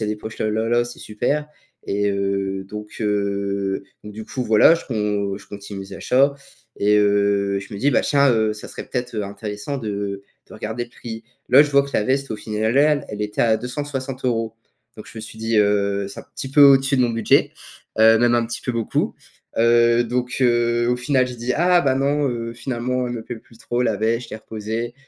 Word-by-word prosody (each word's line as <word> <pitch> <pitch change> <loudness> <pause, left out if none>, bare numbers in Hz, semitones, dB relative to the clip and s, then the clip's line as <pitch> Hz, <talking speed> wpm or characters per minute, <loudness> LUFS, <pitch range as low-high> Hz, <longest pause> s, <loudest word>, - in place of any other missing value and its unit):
y 110 - -1
a - - -2
des 105 - -2
poches 110 +1 -9
là, 110 - 0
là, 110 +1 -1
là, 120 0 +2
c'est 120 - -9
super» 140 +8 -2 0.4
et 100 0 0
heu, 100 -1 -2
donc 105 0 -8
heu, 100 -2 -1 0.2
donc 105 - -9
du 110 +1 -8
coup 130 - -4
voilà, 110 +9 +6
je 165 - -6
con 105 -4 -2
je 95 - -16
continue 100 -1 -8
mes 95 0 -9
achats 140 +2 +2 0.4
et 105 +1 +3
heu, 100 -1 +2
je 100 - -11
me 100 - -5
dis: 145 +5 +2
«Ben - - +4
tiens, 140 -1 +3
heu, 110 -1 +1
ça 105 - -9
serait - - -8
peut-être, 125 -1 -3
heu, 105 - -1
intéressant 105 +6 -5
de 100 -3 -4 0.3
de - - -14
regarder 110 +3 -4
le 120 - -20
prix». 115 -1 -8 0.3
Là, 135 +4 +9
je 145 - -2
vois 140 0 +5
que 140 - -9
la - - +2
veste, 135 +1 0
au - - -4
final 110 +3 -2
al 150 0 +3
elle 105 0 -4
était 105 0 -3
à 110 -2 +3
260€ 125 -3 -3 0.4
Donc 110 - -10
je - - -16
me - - -5
suis 110 - -10
dit, 110 0 -1
heu, 100 -1 +2
c'est - - -10
un - - -16
petit 135 - -5
peu 145 +2 +4
au-dessus 135 0 +6
de 125 - +3
mon 120 - +2
budget, 115 -1 +2 0.5
heu, 110 0 +7
même 120 0 +3
un 120 -1 +2
petit 120 - -5
peu 125 - -3
beaucoup. 115 -1 -1 0.4
Heu, 120 +1 +4
donc 125 +1 -2
heu, 120 -1 +2
au 125 - +2
final 130 0 +1
j'ai 125 - -8
dit: 120 +2 -2
«Ah 175 +1 +4
ben 135 -2 +2
non, 140 +1 +1
heu, 115 -1 -4
finalement, 125 +1 -2
elle 120 - -4
me 115 - -5
plaît 120 - -6
plus 115 - -20
trop 120 +1 -2
la 110 -4 +1
veste», 115 +3 0
je - - -14
l'ai - - -4
reposée. 110 +2 -5
115 Hz, 230 wpm, -21 LUFS, 105-125 Hz, 0.5 s, Là